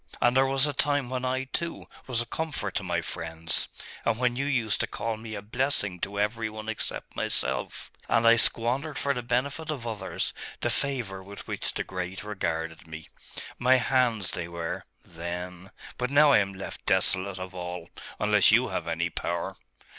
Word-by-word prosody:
And 120 +1 +4
there 135 0 +6
was 135 0 +3
a 145 - 0
time 140 -2 +1
when 130 -1 -1
I, 130 +1 +1
too, 165 +5 -3 0.2
was 120 -3 +1
a - - -3
comfort 160 +5 -3
to - - 0
my 85 -2 0
friends, 80 0 -2 0.4
and 115 -1 +2
when 125 0 +2
you 140 +2 0
used 120 -7 +1
to - - +1
call 115 +1 -2
me 110 0 -6
a 100 - -5
blessing 110 -5 0
to 100 +3 -2
every 110 +2 +1
one 110 0 -7
except 110 -1 -4
myself, - - -1 0.2
as 115 0 +4
I 115 0 +9
squandered 125 +6 +1
for 140 +2 +1
the 125 - -2
benefit 130 +6 0
of 140 -6 -3
others 105 -5 -2 0.3
the - - +1
favour 120 -9 -2
with 100 +2 -10
which - - -2
the - - 0
great 90 +1 -4
regarded 80 -6 -2
me.... 80 0 -8 0.5
My 125 +2 +6
hands 125 -5 +2
they 85 -1 -3
were 85 -1 -4 0.2
then.... 90 +2 -5 0.3
But 125 0 +1
now 145 +1 +7
I - - +8
am 100 -1 -1
left 95 - -7
desolate 95 +1 +2
of 95 0 -6
all: 90 -1 -5 0.3
unless - - +5
you - - +5
have - - -2
any 85 +1 0
power. 85 0 -2
110 Hz, 185 wpm, -28 LUFS, 90-130 Hz, 0.5 s, I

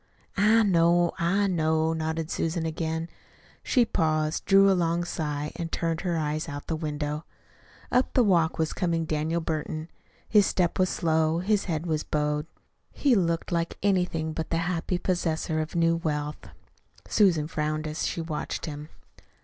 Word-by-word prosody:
'" - - -39
"I 220 +3 +5
know, 175 -2 +3
I 195 +5 +2
know," 160 -3 +1
nodded 160 0 -3
Susan 165 0 -1
again. 160 0 -2 0.5
She 245 -3 +3
paused, 155 -5 0
drew 195 0 +6
a 195 - +5
long 170 -1 +1
sigh, 150 -3 -3
and 165 -1 -5
turned 165 -1 -1
her 175 -3 -1
eyes 155 +1 -2
out 145 0 -6
the 160 - -2
window. 150 -1 -3 0.7
Up 250 +1 +2
the 250 - +5
walk 170 -6 +2
was 160 -1 0
coming 170 -3 0
Daniel 160 +2 -1
Burton. 155 0 -3 0.4
His 210 -3 +5
step 180 0 0
was 185 0 +3
slow, 160 -1 +1
his 200 +3 +1
head 165 -2 -2
was 155 -3 -1
bowed. 150 0 -1 0.4
He 280 -3 +2
looked 170 -6 0
like 170 -1 -1
anything 180 -5 +1
but 160 0 -4
the 165 - 0
happy 180 +1 -1
possessor 165 -3 -1
of 155 +2 -4
new 165 0 +3
wealth. 150 -2 -3 0.6
Susan 170 -8 +3
frowned 155 0 -2
as 155 +1 -2
she 170 - -3
watched 160 -2 -4
him. 150 0 -7
165 Hz, 165 wpm, -27 LUFS, 155-175 Hz, 0.7 s, drew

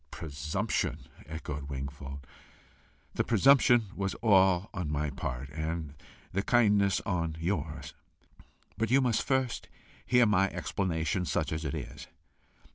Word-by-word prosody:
"Presumption!" 80 +7 -2 0.2
echoed 75 -2 -6
Wingfold. 70 0 -6 0.9
"The - - +1
presumption 120 -1 +5
was 95 -1 -2
all 95 -3 +3
on 90 -6 -3
my 75 -1 -1
part, 65 0 -5
and 80 -1 -3 0.4
the 100 - +1
kindness 105 -4 +3
on 85 -4 -2
yours. 80 -3 -3 0.9
But 110 - +1
you 130 +3 +5
must 125 -4 +2
first 130 -4 -1 0.3
hear 125 -1 +4
my 95 -2 +3
explanation, 90 0 -1
such - - -1
as 80 +1 -2
it 70 - -2
is. - - -7
90 Hz, 120 wpm, -30 LUFS, 75-105 Hz, 0.9 s, presumption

